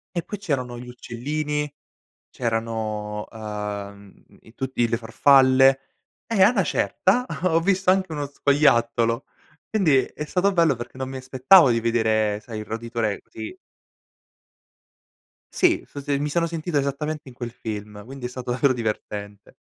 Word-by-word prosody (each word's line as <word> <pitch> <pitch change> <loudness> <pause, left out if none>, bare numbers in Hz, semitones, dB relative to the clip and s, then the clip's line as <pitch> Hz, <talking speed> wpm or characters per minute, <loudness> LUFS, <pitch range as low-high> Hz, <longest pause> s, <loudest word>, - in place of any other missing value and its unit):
E 170 - -1
poi 210 - -6
c'erano 130 -10 -2
gli 125 - -9
uccellini, 150 +5 -3 0.6
c'erano, 110 -3 -3
ehm, 105 -2 -6 0.3
i 110 - -18
tutti 130 -2 -1
le 115 - 0
farfalle, 135 +3 +5 0.5
e 220 -4 +2
a 205 +5 +7
'na 205 -6 +2
certa, 195 - +1 0.2
ho 165 -2 +3
visto 190 +1 +2
anche 185 -3 +1
uno 145 -1 -3
scoiattolo, 120 -5 +2 0.4
quindi 180 -11 +3
è 150 - -7
stato 185 +5 +1
bello, 165 -7 +3
perché 120 +2 -9
non 130 0 -3
mi 135 - -6
aspettavo 130 +4 +5
di 115 0 +2
vedere, 110 -2 +1
sai 110 0 -8
il - - -6
roditore 115 -1 -3
così. 110 -1 -9 2.0
Sì, - - +3
so 145 - -8
se 140 0 -1
mi 150 - -1
sono 170 +3 +1
sentito 165 -1 -2
esattamente, 145 +1 -2
in 125 - -13
quel 120 -1 -6
film, 105 -3 -7
quindi 135 0 -8
è - - -3
stato 125 0 -5
davvero 130 +2 +2
divertente. 105 -3 -5
130 Hz, 150 wpm, -24 LUFS, 115-150 Hz, 2.0 s, a